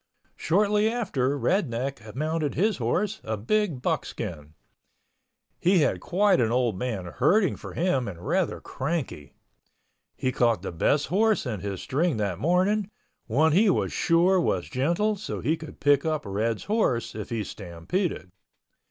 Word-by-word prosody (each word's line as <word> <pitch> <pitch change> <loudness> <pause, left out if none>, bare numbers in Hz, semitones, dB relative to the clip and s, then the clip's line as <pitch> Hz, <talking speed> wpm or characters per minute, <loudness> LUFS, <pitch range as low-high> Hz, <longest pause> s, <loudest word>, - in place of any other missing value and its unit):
Shortly 210 +4 +2
after 145 - -1
Red 155 - +1
Neck 120 -2 -5
mounted 155 +1 -1
his 210 +7 +1
horse, 210 +1 -1
a 110 0 -3
big 155 - 0
buckskin. 75 -2 -3 1.0
He 180 -1 +4
had 145 - +1
quite 190 -2 +2
an 115 -1 +1
old 120 -4 +1
man 105 -3 -3
herding 170 - +2
for - - -9
him 160 -8 0
and 90 -3 -8
rather - - 0
cranky. 135 - -4 0.8
He 130 - 0
caught 115 -7 +1
the - - -4
best 140 - +1
horse 215 +1 +2
in 115 -6 -3
his 100 0 -5
string 155 0 0
that 100 -5 -2
morning, 185 +5 +1 0.4
one 150 +8 +3
he 200 +7 +4
was - - 0
sure 175 +2 +3
was - - -1
gentle 170 +11 0
so 205 - -5
he 160 - +1
could 160 -2 -11
pick 145 -1 +3
up 155 -2 -1
Red's 105 +3 -1
horse 205 - 0
if 105 -1 -6
he 115 -3 -2
stampeded. 90 - -4
145 Hz, 150 wpm, -26 LUFS, 115-185 Hz, 1.0 s, He